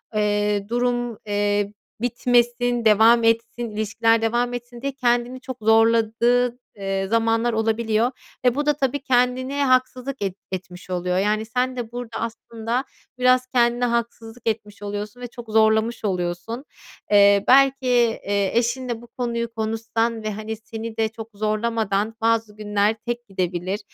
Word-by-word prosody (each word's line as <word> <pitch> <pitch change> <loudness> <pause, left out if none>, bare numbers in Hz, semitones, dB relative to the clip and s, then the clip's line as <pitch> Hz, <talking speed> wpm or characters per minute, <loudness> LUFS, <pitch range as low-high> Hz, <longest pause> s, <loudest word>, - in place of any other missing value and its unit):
eee, 205 -1 +1
durum, 240 -1 -1
eee, 205 0 0 0.3
bitmesin, 240 0 +1
devam 225 +2 +6
etsin, 230 +1 +1
ilişkiler 220 +2 +1
devam 240 +2 0
etsin 240 0 -7
diye 275 +1 -2
kendini 245 -1 0
çok 260 -1 -7
zorladığın, 230 +2 +3 0.2
eee, 195 -1 -2
zamanlar 230 +2 +1
olabiliyor 225 +1 +1 0.3
ve 250 -1 +4
bu 290 +1 -1
da 295 - +4
tabii 280 0 -1
kendine 255 +1 +1
haksızlık 255 0 0
et 195 -2 -2 0.2
etmiş 180 -1 -7
oluyor. 180 0 -1
Yani, 210 +3 +1
sen 250 +3 -1
de 235 -2 -5
burada 240 -1 -6
aslında 230 +1 -3 0.4
biraz 255 0 +4
kendine 240 -1 +2
haksızlık 235 0 -3
etmiş 210 -2 -5
oluyorsun 205 +3 -5
ve 245 - -4
çok 240 -1 -11
zorlamış 220 +1 +2
oluyorsun. 180 +6 -3 0.5
Eee, 200 -1 +6
belki, 270 0 +5 0.4
eee, 200 -1 0
eşinle 240 0 -1
bu 240 - -13
konuyu 235 -1 -3
konuşsan 225 0 -1
ve, 215 - -2
hani, 215 +2 -5
seni 225 +1 -7
de 220 -1 +1
çok 225 0 -9
zorlamadan 215 0 -1
bazı 225 -2 +1
günler 210 0 +1
tek 240 0 -4
gidebilir, 185 0 -2
230 Hz, 140 wpm, -23 LUFS, 210-245 Hz, 0.5 s, devam